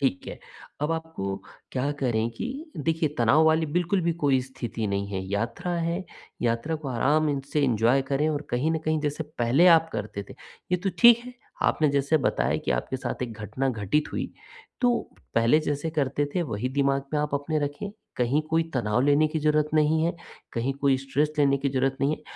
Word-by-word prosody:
ठीक 130 -10 0
है। - - -7 0.4
अब 150 +2 0
आपको 160 -13 -4 0.4
क्या 135 +2 0
करें 115 -3 +1
कि 115 - -5 0.3
देखिए, 160 +1 0
तनाव 130 +7 +5
वाली 160 0 +3
बिल्कुल 180 +2 +2
भी 170 -1 +1
कोई 135 -2 +4
स्थिति 120 -4 -5
नहीं 100 0 -1
है। 95 -2 -3
यात्रा 115 - -2
है, 170 +3 -2 0.4
यात्रा 115 +7 0
को 150 -2 -7
आराम 145 +3 +1
से 150 - +2
एन्जॉय 120 +2 +3
करें 145 +3 +2
और 150 -1 -1
कहीं 130 +6 +1
न 160 - 0
कहीं, 155 0 +1
जैसे 150 +1 -2
पहले 125 +9 +4
आप 165 0 0
करते 105 -1 -4
थे, - - -9 0.4
ये - - +5
तो 195 +2 -1
ठीक 235 -1 +8
है। 250 0 -10 0.3
आपने 155 - +3
जैसे 140 +2 +2
बताया - - +1
कि - - -1
आपके 60 - -1
साथ 125 - -4
एक 120 -2 -4
घटना 130 +6 -2
घटित 115 +5 -1
हुई, - - -3 0.5
तो 245 -1 +3 0.4
पहले 115 +6 +4
जैसे 150 +1 -2
करते 145 -1 0
थे, 180 - +1
वही 115 -2 -3
दिमाग 135 0 +1
में 150 - +1
आप 150 -1 -1
अपने 150 +2 -1
रखें। 145 +8 -3 0.3
कहीं 125 +5 +2
कोई 165 +1 +3
तनाव 115 -2 +1
लेने 145 +3 +4
की 160 - -2
ज़रूरत 150 0 +2
नहीं 155 +1 +3
है, 170 0 -1 0.4
कहीं 120 +4 -1
कोई 140 -1 +2
स्ट्रेस 145 +3 0
लेने 140 -1 +4
की 140 - 0
ज़रूरत 135 0 0
नहीं 140 +2 +2
है - - -20
140 Hz, 200 wpm, -26 LUFS, 125-155 Hz, 0.5 s, ठीक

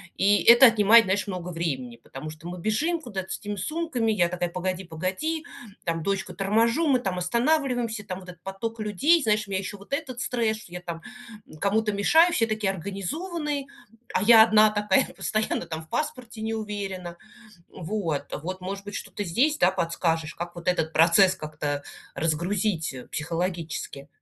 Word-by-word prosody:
И 205 +1 +3
это 240 +2 +9
отнимает, 225 0 +6
знаешь, 190 +2 0
много 180 -2 -5
времени. 135 -8 -3
Потому 135 +6 -9
что 155 +2 -10
мы 180 0 -6
бежим 315 - 0
куда-то 195 -8 -6
с - - -3
этими 205 0 -5
сумками, 255 - -1
я 175 -5 +2
такая: 175 0 -2
"Погоди-погоди"- 185 - -3 0.4
там 165 -1 -2
дочку 195 -1 -2
торможу, 230 +10 +2
мы 260 -3 +4
там 190 -5 -3
останавливаемся, 240 - 0
там 185 0 -5
вот 185 -1 -12
этот 175 -1 -12
поток 225 +4 -5
людей, 275 - +3
знаешь, 215 -2 +1
у - - -10
меня 190 - 0
еще 200 +1 -6
вот 200 +7 -11
этот 260 -5 -3
стресс, 225 -3 0
что 200 -5 -14
я 180 - -4
там 170 -2 -6 0.6
кому-то 210 +3 +1
мешаю, 320 - +4
все 230 - +3
такие 215 -3 0
организованные, 280 - -4 0.5
а - - +2
я 225 0 +9
одна 215 -1 +5
такая 210 +3 +2
постоянно 215 0 -1
там 160 -1 -5
в 160 - -21
паспорте 245 -6 -4
не 220 +1 -2
уверена, 195 -5 -5 0.5
вот. 165 -6 -3 0.2
Вот, 185 +1 -5
может 195 +2 -5
быть, 205 - -7
что-то 205 - -5
здесь, 260 - +1
да, 180 - +4
подскажешь, 165 -2 -1
как 175 0 -6
вот 170 +1 -9
этот 160 -3 +1
процесс 170 +3 +5
как-то 150 -2 -4 0.3
разгрузить, 170 +1 -1
э, 125 - -9
психологически. 165 -3 -4
195 Hz, 170 wpm, -26 LUFS, 175-225 Hz, 0.6 s, это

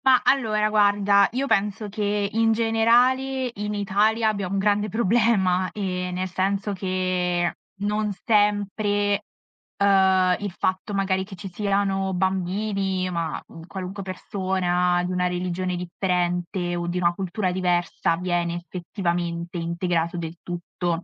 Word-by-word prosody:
Mah, 260 -1 +6
allora 215 -6 +2
guarda, 205 -1 +4
io 265 +3 0
penso 210 -2 0
che 205 0 -1
in 225 0 +3
generale 245 +4 +2
in 210 0 -4
Italia 210 +3 +2
abbiamo 200 -3 -2
un - - +1
grande 205 +1 +1
problema, 200 -4 +2
ehm, 180 -3 -3
nel 185 +1 -2
senso 195 +3 -1
che 185 -2 0 0.3
non 210 +1 0
sempre, 205 -1 +1 0.5
uhm, 190 -2 +4
il 205 -1 -4
fatto 190 +2 -1
magari 190 -1 +1
che 190 0 -10
ci 195 +1 -8
siano 195 0 0
bambini, 190 0 -1
ma, 170 -3 -2
mhmm, 165 0 -12
qualunque 190 +1 -6
persona 185 -2 0
di 180 - -3
una 180 0 +1
religione 180 0 -2
differente 175 0 -1
o 175 0 -3
di 175 +1 -2
una 175 -1 +2
cultura 185 +1 -2
diversa, 175 -2 0
viene 175 -1 -1
effettivamente 175 -1 -3
integrato 170 0 -1
del 165 -1 -5
tutto. 175 0 -3
190 Hz, 130 wpm, -24 LUFS, 180-205 Hz, 0.5 s, Mah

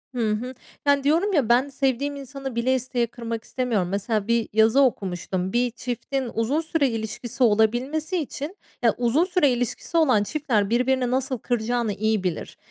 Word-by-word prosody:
Hı 225 -3 +1
hı. 245 +5 -3 0.3
Yani, 285 -1 +3
diyorum, 335 +8 +2
ya, 265 -8 +2
ben 255 +4 +4
sevdiğim 275 +1 -1
insanı 275 -2 -7
bile 255 +3 +2
isteye 245 -2 -1
kırmak 230 -1 -5
istemiyorum. 230 -9 -1
Mesela 205 +2 -1
bir 235 -1 +1
yazı 220 +5 +5
okumuştum. 185 -5 -1
Bir 245 0 +2
çiftin 250 +1 -4
uzun 250 +8 0
süre 315 -4 +1
ilişkisi 225 +2 -3
olabilmesi 245 - +2
için, 305 +4 -5 0.2
ya, 230 -2 +4
uzun 245 +7 +2
süre 355 -6 +3
ilişkisi 245 +7 -2
olan 255 -10 +4
çiftler 225 -7 0
birbirini 250 +1 +1
nasıl 260 0 0
kıracağını 235 -1 -1
iyi 215 -1 0
bilir. 175 -4 -3
245 Hz, 160 wpm, -24 LUFS, 220-275 Hz, 0.3 s, yazı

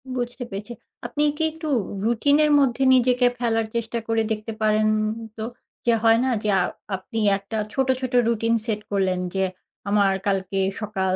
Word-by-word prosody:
বুঝতে 245 +1 -3
পেরেছি। 205 +4 -6 0.3
আপনি 295 +5 -1
কি 320 - +1
একটু 315 0 -6 0.4
রুটিনের 285 +6 +3
মধ্যে 270 -1 +2
নিজেকে 250 0 +4
ফেলার 225 -2 +1
চেষ্টা 230 0 -2
করে 225 0 +1
দেখতে 215 +1 -3
পারেন? 215 0 +3 0.5
তো 220 - -4 0.4
যে 235 - +4
হয় 225 0 +5
না - - +1
যে 210 - 0 0.5
আপনি 225 +4 -6 0.2
একটা 200 +3 -6 0.2
ছোট, 265 -1 +1
ছোট 255 -1 -4
রুটিন 230 0 +1
সেট 215 -3 -2
করলেন 190 -2 +1 0.2
যে 190 - +1 0.5
আমার 200 -1 +3
কালকে 195 -1 0 0.2
সকাল 190 -3 -1
225 Hz, 155 wpm, -23 LUFS, 205-245 Hz, 0.5 s, হয়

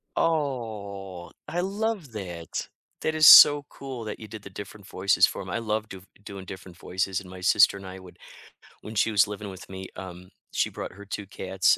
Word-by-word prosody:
Oh, 105 - -2 0.2
I 175 - -1
love 200 - -2
that. 85 -6 -5 0.3
That 155 - -1
is 155 -1 +6
so 145 -1 +10
cool 130 -4 -7
that 105 - -6
you 110 - -9
did 110 0 -9
the 100 - -10
different 100 +1 -10
voices 95 0 +3
for - - -5
him. 95 - -8
I 95 - -2
love 110 -1 -2
do 95 - -10 0.2
doing 100 -1 -8
different 95 -2 -10
voices, 95 +2 -2
and 95 - -13
my 95 0 -10
sister 95 +2 +5
and 100 - -10
I 95 0 -8
would 90 -1 -14 0.6
When 110 - -9
she 110 - +2
was 105 -1 +4
living 105 0 -6
with 95 -1 -11
me, 95 0 -7
um, 90 -1 -9 0.2
she - - +1
brought - - -6
her 100 +2 -12
2 100 0 -6
cats, 95 -1 +1
100 Hz, 205 wpm, -26 LUFS, 95-115 Hz, 0.6 s, so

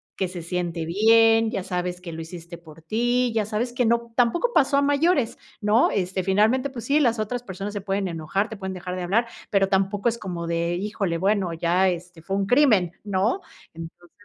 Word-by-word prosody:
que 190 - -1
se 175 -2 -7
siente 175 -1 -3
bien, 225 +5 +4
ya 195 -5 -3
sabes 180 -1 -3
que 180 -2 -8
lo 165 - -6
hiciste 170 +1 -9
por 160 -1 -15
ti, 240 +6 +1
ya 220 -2 0
sabes 235 +3 -2
que 245 0 +1
no 235 0 0
tampoco 260 - +2
pasó 280 -2 +3
a 280 - +3
mayores, 285 -2 +1 0.2
¿no?, 215 +3 +3
este, 185 0 -1
finalmente, 215 +8 +2
pues 245 -4 -8
sí, 290 +2 +3
las 240 -5 +2
otras 220 +3 -3
personas 200 -2 -6
se 205 - -4
pueden 195 0 -1
enojar, 170 +5 -2
te 220 - -8
pueden 190 -2 -5
dejar 180 0 -5
de 185 - -4
hablar, 200 +7 +1 0.2
pero 195 -1 +2
tampoco 195 +3 +1
es 235 0 -5
como 175 -4 -5
de: 170 +1 -1
"Híjole, 195 -2 -2
bueno, 195 0 +1
ya, 175 +3 +2
este, 175 -1 -6
fue 195 +4 -3
un 195 0 0
crimen", 215 - +4
¿no? 205 - 0 0.3
Entonces, 165 +1 -11
195 Hz, 205 wpm, -24 LUFS, 180-230 Hz, 0.3 s, bien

